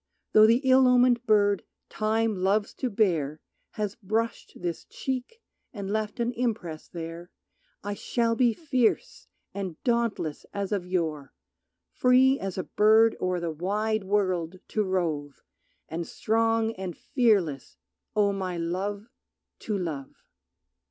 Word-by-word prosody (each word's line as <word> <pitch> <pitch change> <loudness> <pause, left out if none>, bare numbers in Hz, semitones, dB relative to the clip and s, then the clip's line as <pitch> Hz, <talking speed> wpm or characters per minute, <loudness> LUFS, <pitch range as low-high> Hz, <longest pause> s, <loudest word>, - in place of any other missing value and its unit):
Though 215 0 +8
the 230 +3 +4
ill 260 0 +6
omened 250 -1 +4
bird 205 -2 +3 0.2
Time 220 0 0
loves 195 +3 +1
to 255 - -2
bear 165 -9 +1 0.3
Has 210 -2 -2
brushed 225 +2 -3
this 175 -2 -3
cheek 265 - -5 0.3
and 200 -3 -5
left 215 +1 -2
an 235 +1 0
impress 220 -10 -3
there 170 0 -7 0.5
I 205 +1 -3
shall 230 +2 0
be 240 0 +4
fierce 260 -8 0 0.3
and 190 -5 -5
dauntless 235 - 0
as 200 0 -2
of 195 -4 -1
yore, 160 -6 -2 0.6
Free 260 +2 +4
as 195 -1 -4
a 185 - -1
bird 220 +1 +4
o'er 185 -1 0
the 170 -1 -2
wide 210 +6 -1
world 185 -3 0
to 215 - 0
rove, 160 -7 -2 0.4
And 165 +1 -4
strong 225 0 +1
and 185 -3 -5
fearless, 200 - +1 0.4
O 205 -1 +3
my 185 -3 -3
Love, 190 +5 -3 0.5
to 210 -2 -2
love. 155 -7 -5
205 Hz, 130 wpm, -27 LUFS, 180-225 Hz, 0.6 s, Though